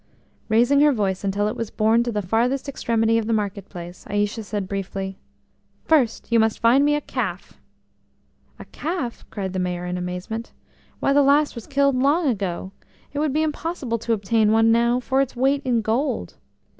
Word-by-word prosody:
Raising 240 +6 +4
her 295 0 +6
voice 200 -6 -1
until 200 +1 0
it 215 - -2
was 230 -2 -4
borne 220 +2 +2
to 240 0 -1
the 210 -2 -2
farthest 240 +9 0
extremity 230 -4 +1
of 220 - -4
the 230 - +1
market 205 -2 -2
place, 175 -1 -9
Aïcha 205 +2 -1
said 205 -2 -4
briefly: 195 0 -4 0.7
"First 260 -8 +1
you 230 - +5
must 220 -1 +2
find 240 +4 +4
me 295 0 +3
a 295 - -1
calf!" - - -5 1.0
"A - - -10
calf?" 305 -7 -5
cried 190 -3 -4
the 185 - -2
Mayor 180 -1 -2
in 180 0 -3
amazement. 180 +6 -5 0.5
"Why, 275 - +2
the 285 - +5
last 285 +2 +3
was 235 -3 -9
killed 280 -1 +2
long 285 +6 +2
ago. 190 -6 -2 0.4
It 290 - -2
would 300 -1 +1
be 310 +3 +1
impossible 300 -6 -3
to 230 - -1
obtain 215 +1 +2
one 225 +1 +4
now 235 +2 +3
for 265 +2 +1
its 270 -2 -2
weight 270 +3 +2
in 240 -3 +1
gold." 235 +7 -1
230 Hz, 185 wpm, -23 LUFS, 205-270 Hz, 1.0 s, her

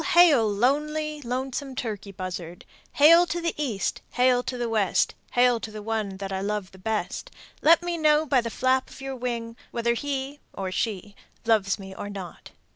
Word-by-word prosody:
Hail! 295 -11 +7
Lonely, 300 +7 0
lonesome 260 +2 -3
turkey 210 -5 -4
buzzard: 180 -2 -6 0.3
Hail 335 +4 +7
to 345 - -2
the 335 -1 -1
East, 235 -11 -2
hail 250 0 +4
to 250 0 -4
the 240 -1 -1
West, 215 -5 +2 0.2
Hail 245 -1 +4
to 225 - -6
the 215 -1 -8
one 215 -3 -2
that 195 0 -5
I 190 - -2
love 205 -1 -2
best. 220 - -2 0.3
Let 330 +2 +6
me 345 -1 -2
know 305 0 +4
by 270 -4 +3
the 230 - -4
flap 260 +2 +1
of - - -13
your 270 0 -5
wing 235 -2 -4
Whether 235 0 0
he 275 +2 -3
(or 190 -1 -4
she) 205 0 -3 0.3
loves 210 -4 +2
me 190 -2 -9
or 205 - -6
not. 195 -4 -8
240 Hz, 180 wpm, -26 LUFS, 205-285 Hz, 0.3 s, Hail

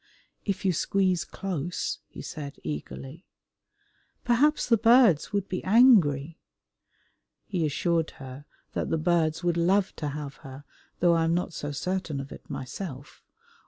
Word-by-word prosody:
"If 195 -1 -2
you 185 - +3
squeeze 185 +1 +1
close," 175 -3 -4
he - - -10
said 145 -2 -7
eagerly. 135 - -7 1.0
"Perhaps 275 +6 +3
the 235 - +5
birds 230 - +5
would 200 -1 -1
be 185 - -4
angry?" 180 - +4 1.1
He 180 -7 -1
assured 165 +2 0
her 135 +1 -9 0.3
that - - -2
the 165 - +1
birds 160 0 +1
would 175 -1 +1
love 185 +3 +2
to 150 - -3
have 145 -1 -6
her, 135 -2 -11 0.4
though 175 -1 +5
I 165 -1 +2
am 165 +1 +2
not 175 0 -2
so 145 -1 -4
certain 170 0 -3
of 135 +1 -7
it - - -12
myself. 135 0 -7
170 Hz, 145 wpm, -27 LUFS, 145-190 Hz, 1.1 s, the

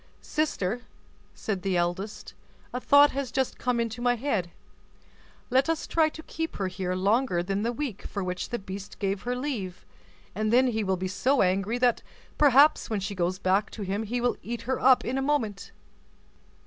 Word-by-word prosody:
"Sister!" 245 -8 -1 0.5
said 200 -4 -3
the 185 -1 0
eldest, 180 +5 -3 0.4
"a 250 - -1
thought 285 +2 +6
has 270 -2 -3
just 265 0 -1
come 250 -1 0
into 230 0 -2
my 245 0 +3
head; 220 -8 -1 1.0
let 265 +4 +3
us 325 -1 0
try 320 -2 +2
to 315 +1 -10
keep 325 0 -4
her 195 - -2
here 185 0 -3
longer 200 -1 +1
than 195 +2 -1
the 230 +2 0
week 245 -5 -4
for 200 - -4
which 180 0 -3
the 240 - -2
beast 195 -1 -8
gave 195 -1 -1
her 245 +1 -2
leave; 245 -9 -4 0.5
and 215 +1 -1
then 255 +2 +5
he 220 -2 -1
will 190 -1 0
be 185 +1 -2
so 255 +8 +2
angry 195 +5 +1
that 245 -1 +2 0.4
perhaps 290 +1 +5
when 215 -2 0
she 195 +1 -4
goes 180 0 -1
back 195 +2 +1
to 215 - -7
him 195 +2 -2
he 230 +3 -2
will 245 0 0
eat 235 0 -5
her 260 +1 -1
up 260 0 +5
in 260 +2 -1
a - - 0
moment." 250 -8 -1
225 Hz, 190 wpm, -27 LUFS, 195-260 Hz, 1.0 s, thought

